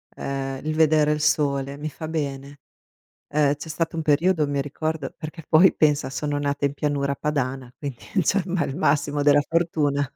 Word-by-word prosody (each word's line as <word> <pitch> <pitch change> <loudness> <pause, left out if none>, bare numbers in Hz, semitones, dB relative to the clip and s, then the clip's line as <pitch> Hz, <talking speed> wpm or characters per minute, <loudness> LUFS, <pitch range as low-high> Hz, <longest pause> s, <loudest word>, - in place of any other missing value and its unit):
ehm, 135 -1 -4
il 155 - -1
vedere 155 -1 +4
il 150 0 -1
sole, 140 -2 +1
mi 155 +1 -5
fa 160 +1 -7
bene. 140 -3 -4 0.7
Ehm, 145 -1 +2
c'è 155 +3 -9
stato 165 +1 -2
un 165 - -1
periodo 155 +1 +2
mi 140 -1 -1
ricordo 150 0 -3
perché 155 0 -8
poi 175 +4 +6
pensa, 150 -3 +2
sono 145 +1 -2
nata 145 0 -1
in 140 - 0
pianura 145 -1 -1
padana, 135 -4 -2
quindi 140 -5 -6 0.2
cioè 200 +6 +2
me 180 -1 0
il 135 - -5
massimo 145 -3 +1
della 145 0 +5
fortuna, 155 -4 +1
145 Hz, 175 wpm, -24 LUFS, 140-155 Hz, 0.7 s, poi